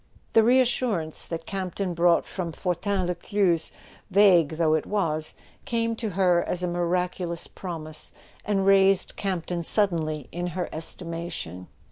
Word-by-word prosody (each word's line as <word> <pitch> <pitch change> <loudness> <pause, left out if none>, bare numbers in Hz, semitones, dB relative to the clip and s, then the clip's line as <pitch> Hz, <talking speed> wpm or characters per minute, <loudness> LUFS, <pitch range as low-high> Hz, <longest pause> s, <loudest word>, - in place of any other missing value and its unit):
The 225 - +7
reassurance 235 -8 +2
that 165 -1 -5
Campton 190 -1 -3
brought 170 0 +3
from 175 -3 -4
Fortin 185 +2 -1
Lescluze, 175 -1 +1 0.4
vague 185 -6 +5
though 160 -2 +3
it 155 - 0
was, 155 -7 -1 0.3
came 230 -1 0
to 225 -2 -2
her 180 -2 +3
as 180 0 -1
a - - +1
miracu¬ 175 +1 -1
lous 170 0 -3
promise, 155 -4 -6 0.3
and 195 -2 0
raised 195 -1 +4
Campton 180 -3 -2
suddenly 160 - +1
in 175 +1 -3
her 180 - -1
estimation. 165 - -5
175 Hz, 135 wpm, -26 LUFS, 165-195 Hz, 0.4 s, The